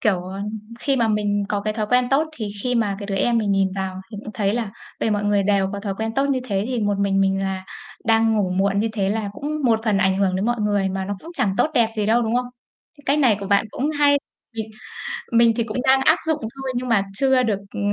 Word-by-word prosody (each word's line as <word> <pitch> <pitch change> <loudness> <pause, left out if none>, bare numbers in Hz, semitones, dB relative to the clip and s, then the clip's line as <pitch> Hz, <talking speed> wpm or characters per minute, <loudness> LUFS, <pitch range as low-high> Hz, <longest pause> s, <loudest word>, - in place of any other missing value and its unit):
kiểu, 195 -6 +1
ờ, 190 +2 -6 0.4
khi 275 +1 +1
mà 230 -3 +2
mình 205 -1 +1
có 205 - 0
cái 215 +1 -1
thói 215 -1 -2
quen 250 +2 +3
tốt 285 +4 +3
thì 215 -3 -3
khi 250 0 0
mà 210 -4 +1
cái 200 - -6
đứa 195 - -3
em 235 +4 +2
mình 210 -3 +1
nhìn 195 -1 +3
vào 190 -1 -4
thì 215 - -7
cũng 215 - -7
thấy 200 0 +1
là 230 -4 -2 0.3
về 225 - +1
mọi 205 0 0
người 205 -1 +2
đều 195 -1 +2
có 200 - -4
thói 200 -1 -3
quen 220 +2 -3
tốt 275 - +2
như 265 -2 +1
thế, 200 -5 -1
thì 250 -2 -1
một 205 -1 0
mình 195 -1 +2
mình 195 0 +2
là 190 -1 -3 0.4
đang 225 0 +3
ngủ 195 -3 +1
muộn 195 +2 +1
như 225 - +1
thế 195 -3 0
là 210 0 -1
cũng 300 +4 -4
một 225 -3 +3
phần 210 -3 +2
ảnh 190 0 +2
hưởng 190 -2 +2
đến 190 - -1
mọi 240 0 0
người, 205 -2 +1
mà 190 0 -3
nó 200 +1 -3
cũng 335 - -10
chẳng 215 -8 +1
tốt 310 - +3
đẹp 230 -2 +4
gì 210 -1 0
đâu, 235 +2 +3
đúng 225 +1 -1
không? 250 0 0 0.5
Cái 290 - -18
cách 280 +2 +3
này 250 -8 +4
của 200 - -4
bạn 200 +2 +3
cũng 285 +4 -1
hay, 290 -1 +4 0.4
mình 220 -1 -4 0.6
mình 235 0 +5
thì 230 - +1
cũng 220 0 -5
đang 265 0 +6
áp - - +6
dụng 315 -1 +1 0.2
thôi 270 -1 -4
nhưng 250 +1 -2
mà 225 -5 +3
chưa 260 +4 +3
được, 210 -4 0 0.2
ừ, - - -3
215 Hz, 275 wpm, -22 LUFS, 195-240 Hz, 0.6 s, đang